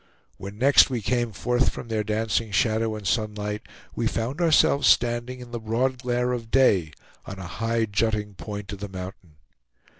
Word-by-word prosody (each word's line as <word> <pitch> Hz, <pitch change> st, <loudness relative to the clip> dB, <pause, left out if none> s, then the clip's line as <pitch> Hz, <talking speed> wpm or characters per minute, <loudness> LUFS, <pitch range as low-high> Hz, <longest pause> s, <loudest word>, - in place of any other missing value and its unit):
When 100 Hz, +2 st, -8 dB
next 140 Hz, +5 st, +6 dB
we 120 Hz, -4 st, -3 dB
came 120 Hz, +1 st, 0 dB
forth 120 Hz, +5 st, +1 dB
from -, -, -7 dB
their 110 Hz, -2 st, -1 dB
dancing 110 Hz, +1 st, -1 dB
shadow 110 Hz, +2 st, +1 dB
and 105 Hz, -2 st, -8 dB
sunlight, 105 Hz, +1 st, -1 dB, 0.3 s
we -, -, 0 dB
found 125 Hz, +9 st, -3 dB
ourselves 155 Hz, -3 st, +4 dB
standing 120 Hz, +1 st, +2 dB
in 120 Hz, -1 st, -11 dB
the 120 Hz, -, -4 dB
broad 120 Hz, +4 st, -1 dB
glare 125 Hz, 0 st, 0 dB
of 115 Hz, -3 st, -4 dB
day, 95 Hz, -, +3 dB, 0.3 s
on 95 Hz, -, -7 dB
a 95 Hz, -, -7 dB
high 115 Hz, +6 st, -1 dB
jutting 105 Hz, 0 st, -1 dB
point 105 Hz, +1 st, -7 dB
of 100 Hz, -, -8 dB
the 105 Hz, 0 st, -6 dB
mountain. 95 Hz, -3 st, -9 dB
110 Hz, 175 wpm, -25 LUFS, 105-120 Hz, 0.3 s, next